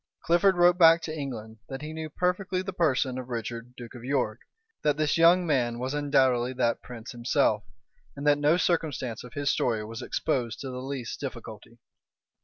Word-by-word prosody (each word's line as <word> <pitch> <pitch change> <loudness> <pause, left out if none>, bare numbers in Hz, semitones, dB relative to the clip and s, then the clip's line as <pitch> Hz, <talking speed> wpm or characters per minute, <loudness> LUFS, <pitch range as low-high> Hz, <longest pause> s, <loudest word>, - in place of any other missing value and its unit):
Clifford 175 +3 +4
wrote 175 +1 +5
back 165 -1 +8
to 155 - -4
England, 115 -7 -6
that 135 +2 -6
he 155 +1 -6
knew 160 0 -5
perfectly 180 +3 -1
the 190 0 -5
person 135 -7 +1
of 130 0 -8
Richard, 120 +1 -5
duke 120 -2 -10
of 120 -2 -10
York, 125 -4 -1 0.4
that 150 -1 +1
this 155 -1 +1
young 170 +2 +5
man 125 -7 +1
was 130 +3 -3
undoubtedly 130 -4 +2
that 120 -2 0
prince 120 -1 -9
himself, 120 -3 +1 0.5
and 140 +1 -6
that 145 0 +4
no 150 +4 +4
circumstance 150 -10 -1
of 125 - -12
his 145 -1 0
story 110 -3 0
was 115 +1 -7
exposed 125 -8 -2
to 135 - -5
the 125 0 -5
least 130 -3 -5
difficulty. 115 -4 -8
135 Hz, 185 wpm, -27 LUFS, 120-155 Hz, 0.5 s, back